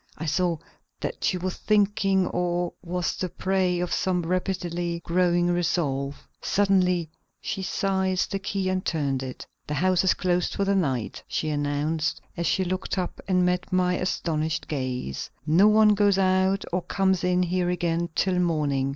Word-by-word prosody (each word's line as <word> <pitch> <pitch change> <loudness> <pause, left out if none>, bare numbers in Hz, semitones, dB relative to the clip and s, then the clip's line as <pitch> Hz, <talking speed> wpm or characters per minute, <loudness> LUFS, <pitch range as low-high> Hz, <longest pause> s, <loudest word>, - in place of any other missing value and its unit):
I 160 - -5
saw 170 +1 +1 0.4
that - - -4
she 185 - +1
was 180 +1 -3
thinking 200 -2 +2
or 175 0 -1
was 180 0 -2
the 185 - -3
prey 185 -1 0
of 180 0 -1
some 180 -2 0
rapidly 175 -1 -2
growing 175 0 +2
resolve. 145 -5 -1
Suddenly 180 -5 +2 0.3
she 195 - -4
seized 190 -1 0
the 195 - -1
key 195 -1 -2
and 185 0 0
turned 140 -5 -1
it. 130 -1 -7 0.2
"The 150 - -2
house 185 +2 +2
is 190 - +3
closed 180 -1 0
for 200 - 0
the 200 - +2
night," 135 - -1
she 155 - -2
announced 150 +2 -1 0.2
as 170 - -1
she 190 - +2
looked 185 +2 -2
up 180 -2 -3
and 180 -2 +3
met 180 0 -1
my 180 -1 +2
astonished 160 -3 -1
gaze. 130 - -3 0.2
"No 170 +7 +5
one 215 0 +6
goes 205 -1 +3
out 190 +1 +2
or 180 - +1
comes 190 0 0
in 180 0 +2
here 180 0 0
again 170 -1 0
till 185 -2 +1
morning. 150 -6 +1
180 Hz, 165 wpm, -25 LUFS, 165-190 Hz, 0.4 s, one